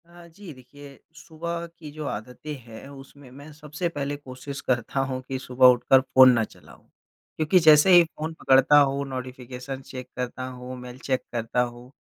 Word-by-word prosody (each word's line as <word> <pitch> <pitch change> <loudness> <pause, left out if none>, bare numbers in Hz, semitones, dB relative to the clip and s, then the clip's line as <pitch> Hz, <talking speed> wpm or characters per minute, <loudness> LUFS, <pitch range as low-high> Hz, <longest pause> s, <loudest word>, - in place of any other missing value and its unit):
हाँ, 170 0 -16
जी 180 +1 -12
देखिए, 140 +2 -15 0.2
सुबह 170 +1 -6
की 155 -3 -10
जो 155 0 -7
आदतें 125 +8 -7
हैं 115 +1 -12
उसमें 140 0 -14
मैं 145 +4 -13
सबसे 150 +3 -5
पहले 145 -2 -4
कोशिश 140 0 -9
करता 125 +1 -1
हूँ 130 -1 -4
कि 135 - -3
सुबह 130 0 +1
उठकर 130 +2 +3
फ़ोन 130 -1 +6
ना 115 -2 +1
चलाऊँ - - -14 0.5
क्योंकि 155 +4 +3
जैसे 155 +2 +6
ही 175 -1 +9
फ़ोन 160 0 -7
पकड़ता 135 +2 +5
हूँ 140 0 +1
नोटिफ़िकेशन 130 0 -7
चेक 130 -1 -9
करता 125 0 -4
हूँ, 125 0 -8
मेल 125 0 -10
चेक 130 -1 -2
करता 120 +1 -1
हूँ, 120 +1 -6
135 Hz, 175 wpm, -25 LUFS, 125-150 Hz, 0.5 s, ही